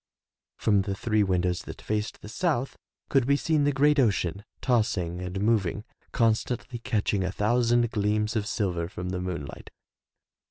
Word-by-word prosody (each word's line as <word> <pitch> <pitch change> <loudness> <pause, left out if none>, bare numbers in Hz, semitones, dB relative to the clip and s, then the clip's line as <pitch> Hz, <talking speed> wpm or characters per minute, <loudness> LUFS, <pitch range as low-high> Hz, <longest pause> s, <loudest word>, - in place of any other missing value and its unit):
From 100 -2 +3
the 95 0 -3
three 110 +1 +1
windows 90 -2 +1
that - - -9
faced 105 0 -3
the - - -8
south 135 +1 -1 0.3
could 135 -3 +2
be 140 - +4
seen 150 0 +1
the 145 - +3
great 145 +2 +3
ocean, 100 -5 +1 0.2
tossing 90 -8 0
and 90 +1 -4
moving, 105 -2 +1 0.3
constantly 115 +2 0
catching 105 -4 0
a 95 - -1
thousand 120 +3 +2
gleams 105 0 0
of 105 -2 0
silver 90 -7 -1
from 90 0 -5
the 90 -1 -3
moon 90 -5 -3
light. - - -10
105 Hz, 160 wpm, -27 LUFS, 95-120 Hz, 0.3 s, be